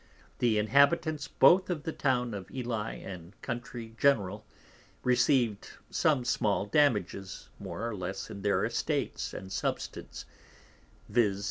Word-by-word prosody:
The 115 -3 +3
Inhabitants 140 +7 +3
both 185 +3 +5
of 165 -5 -2
the 160 - -2
Town 125 -4 0
of 100 -2 -6
Ely 115 -4 -3
and 90 0 -9
Country 120 -1 -5
general, 105 -7 +2 0.6
receiv'd 125 -4 +2 0.2
some 145 -6 +2
small 105 -6 +1
damages 105 -6 0
more 115 - -4
or 115 - -3
less 95 +3 -5
in 100 -2 -7
their 100 0 +2
Estates - - -2
and 95 0 -8
Substance, - - -4 0.9
_viz. 105 -5 +2
115 Hz, 125 wpm, -30 LUFS, 100-135 Hz, 0.9 s, both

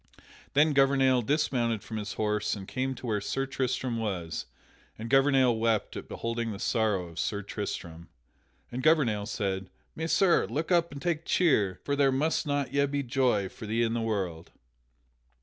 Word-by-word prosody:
Then 150 +2 +4
Gouvernail 135 -2 +4
dismounted 120 -5 0
from 110 - -6
his 105 -1 -4
horse 105 0 0
and 95 -2 -8
came 130 0 -2
to 125 - -9
where 105 -3 0
Sir 135 +6 -1
Tristram 130 -3 -2
was, 90 -7 -3 0.5
and 115 +1 -6
Gouvernail 135 -3 +4
wept 110 -1 0
at - - -7
beholding 115 0 -3
the 100 - -5
sorrow 105 -5 0
of 85 - -9
Sir 100 -1 -1
Tristram. 85 -5 -6 0.6
And 125 +1 -3
Gouvernail 125 -9 +3
said: 95 -3 -2 0.3
"Messire, 170 +3 +2
look 160 +5 -3
up 170 -1 +3
and 145 - -7
take 165 +2 -1
cheer, 105 - +2
for 140 - 0
there 140 -1 +3
must 150 +4 0
yet 140 0 +1
be 140 0 -1
joy 125 -6 +1
for 110 +3 -10
thee 115 +2 +1
in 115 -1 0
the 120 - -1
world." 95 -7 -3
120 Hz, 165 wpm, -29 LUFS, 105-140 Hz, 0.6 s, Then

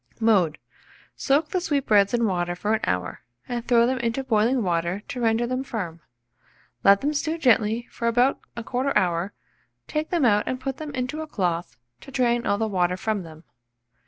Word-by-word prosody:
Mode. 195 -9 +3 0.6
Soak 295 +2 +1
the 370 - -1
sweetbreads 220 - +2
in 235 -1 +1
water 175 -3 -1
for 210 +4 -1
an 220 - +2
hour, 90 0 -2 0.3
and 240 -1 -4
throw 235 -1 +5
them 255 +1 0
into 235 +3 -1
boiling 235 +1 +2
water 175 +2 -1
to 250 - -4
render 225 +1 +2
them 255 +2 -2
firm. 180 -10 -5 0.8
Let 200 0 +6
them 295 +2 0
stew 315 +2 -1
gently 235 -5 +2
for 235 - -3
about 245 +3 +3 0.2
1/4 255 +4 -1
hour, 175 +2 +1 0.5
take 305 0 -2
them 335 -7 +1
out 210 -3 +3
and 255 - -2
put 265 0 -4
them 310 -1 -6
into 255 +5 -3
a 315 - -6
cloth 175 - -2 0.2
to - - -13
drain 240 -3 +1
all 200 - +2
the 220 +1 0
water 180 -3 0
from 215 +1 -1
them. 160 -2 -12
230 Hz, 185 wpm, -24 LUFS, 190-255 Hz, 0.8 s, Let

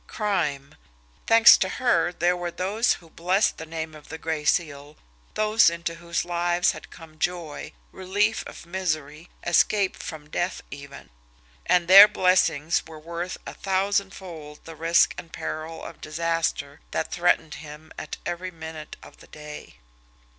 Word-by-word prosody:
Crime! 165 -10 -2 0.5
Thanks 225 0 +8
to 190 - 0
her, 175 -7 +1
there 175 0 +1
were 175 0 -3
those 200 +7 +1
who 165 - -12
blessed 185 +5 +1
the 160 - -7
name 160 0 -5
of 150 -1 -14
the 160 - -6
Gray 160 -1 -3
Seal, 145 -2 -1 0.4
those 215 -2 +4
into 170 0 -4
whose 170 0 -3
lives 175 0 +1
had - - -11
come 160 -2 -14
joy, 170 -3 -3 0.2
relief 205 +4 0
from 170 - -14
misery, 155 -4 -3 0.2
escape 190 +3 +3
from 155 -4 -8
death 175 +1 -2
even 140 - -10 0.6
and 175 -1 +3
their 195 +3 +11
blessings 180 -6 +2
were 160 -1 -10
worth 170 +3 -5
a - - -7
thousandfold 190 -5 -3
the 165 - -9
risk 165 +2 +3
and 165 - -11
peril 160 +1 -6
of - - -10
disaster 160 -2 -2
that - - -3
threatened 170 -3 +1
him 155 0 -11
at - - -6
every 180 +1 -3
minute 160 -2 -9
of - - -15
the - - -17
day. 150 0 -10
170 Hz, 150 wpm, -25 LUFS, 155-185 Hz, 0.6 s, their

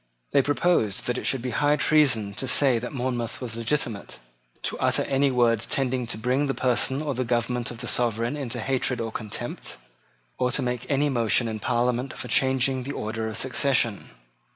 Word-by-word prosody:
They 140 - +5
proposed 145 - +1
that 125 0 -1
it - - -7
should 130 -3 0
be 125 - -2
high 145 +4 +2
treason 135 -9 +3
to 130 - -3
say 125 -2 +4
that 125 - -6
Monmouth 125 -3 -3
was 120 -3 -4
legitimate, 115 -3 -2 0.5
to - - -3
utter - - +2
any 140 +1 +2
words 120 -3 +2
tending 130 -2 0
to 115 - -2
bring 130 +5 0
the 135 - -1
person 130 +3 +1
or 145 -2 -2
government 120 -1 -1
of 120 -1 -8
the 120 - -4
sovereign 120 +2 +1
into 125 -5 -4
hatred 130 0 0
or 115 -1 -3
contempt, 110 -2 -5 0.6
or 125 -1 +2
to 135 - +1
make 125 0 -3
any 145 +1 +2
motion 120 -2 +2
in 110 -1 -4
Parliament 125 +2 0
for - - -6
changing 130 +1 +2
the 140 +3 -5
order 110 -1 -3
of 110 0 -3
succession. 130 -4 +1
125 Hz, 185 wpm, -25 LUFS, 115-135 Hz, 0.6 s, They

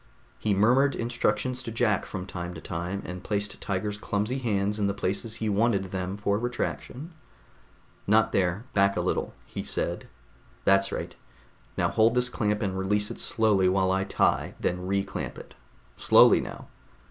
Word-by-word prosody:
He 105 -2 +1
murmured 125 +7 +4
instructions 120 +1 -1
to 120 - -6
Jack 110 -3 +1
from 95 -2 -5
time 90 -2 -6
to - - -7
time, 90 +4 -4
and 90 0 -7
placed 105 -1 -3
Tiger's 105 +1 -2
clumsy 105 +6 -1
hands 105 -3 0
in 100 - +2
the 100 - -1
places 100 +4 -2
he 110 - -3
wanted 105 -1 +2
them 95 +1 -3
for 100 0 0
retraction. 125 +5 -4 1.0
"Not 110 +1 +4
there, 95 +3 +1
back 100 0 +3
a - - +1
little," - - -2
he - - -6
said. - - -3 0.6
"That's 95 0 +4
right. - - -4 0.6
Now - - +2
hold 115 +2 +3
this 125 0 +1
clamp 105 -2 -1
and 95 -2 -1
release 105 +2 0
it - - -8
slowly 105 -5 +2
while 95 0 +2
I 95 0 +1
tie, 95 - +1
then 90 +1 -2
reclamp 100 0 -2
it. - - -11 0.4
Slowly - - +6
now - - -8
100 Hz, 165 wpm, -27 LUFS, 95-110 Hz, 1.0 s, Slowly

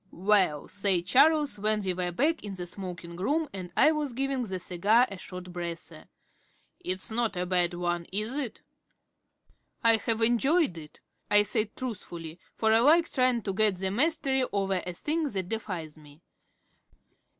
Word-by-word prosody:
"Well," 190 -6 +2
said 195 -4 0
Charles, 295 - +4
when 215 0 0
we 185 -1 -1
were 180 0 -2
back 305 - 0
in 200 -2 -6
the 180 -1 -5
smoking 175 -2 -7
room 300 - 0
and 185 -2 -7
I 310 - +6
was 300 -4 -2
giving 270 +1 -1
the 190 -6 -4
cigar 205 +8 +3
a 195 - -7
short 180 -1 -9
breather, 170 -2 -7 0.7
"it's 185 +5 -2
not 225 -2 0
a 180 - -1
bad 180 -1 +1
one, 175 -1 -2
is 215 +6 -1
it?" 275 -6 -4 1.2
"I 230 -1 +6
have 225 +1 -1
enjoyed 270 - +3
it," 155 -2 -12 0.3
I 205 0 +6
said 210 0 -2
truthfully, 175 -9 -6 0.2
for 220 -1 +2
I 225 - +5
like 320 +7 +4
trying 255 -3 +2
to 195 - -2
get 210 -1 +2
the 190 +1 -2
mastery 270 +1 +1
over 195 -2 0
a 180 - -3
thing 310 - -1
that 190 -6 -3
defies 180 -9 -5
me. 150 +2 -17
200 Hz, 165 wpm, -28 LUFS, 180-245 Hz, 1.2 s, I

